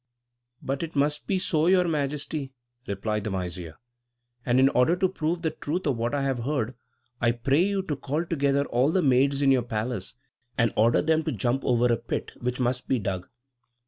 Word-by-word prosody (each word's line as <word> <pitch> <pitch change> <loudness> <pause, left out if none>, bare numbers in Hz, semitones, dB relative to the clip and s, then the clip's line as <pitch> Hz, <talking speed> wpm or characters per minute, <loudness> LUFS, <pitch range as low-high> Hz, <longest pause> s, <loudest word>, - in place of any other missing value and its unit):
"But 135 +1 -2
it 165 -2 -5
must 150 +1 0
be 195 - +1
so, 165 -3 +1
Your 180 -1 +4
Majesty," 145 -2 -2 0.3
replied 105 +1 -2
the 110 - -2
vizier; 90 -4 -5 0.7
"and 125 +1 +2
in 135 - +6
order 125 +6 +3
to 185 +1 +2
prove 170 -1 -2
the 160 - +1
truth 175 +6 -3
of 140 -4 +1
what 115 +4 -1
I 140 - 0
have 135 -2 0
heard, 130 -1 -1 0.5
I 120 -1 +3
pray 135 +6 +2
you 195 +1 +1
to 155 -5 -2
call 150 +5 -2
together 140 -3 +1
all 125 +3 +2
the 185 +1 +2
maids 140 +1 +3
in 135 - +5
your 130 -2 +4
palace, 110 -3 -4 0.4
and 115 -3 +2
order 115 +2 +3
them 160 +1 +2
to 155 - 0
jump 120 +3 -1
over 120 -1 +2
a - - +1
pit, 115 - -4
which 125 +1 -2
must 125 0 -1
be 130 - +2
dug. 95 -4 -3
135 Hz, 200 wpm, -26 LUFS, 120-155 Hz, 0.7 s, in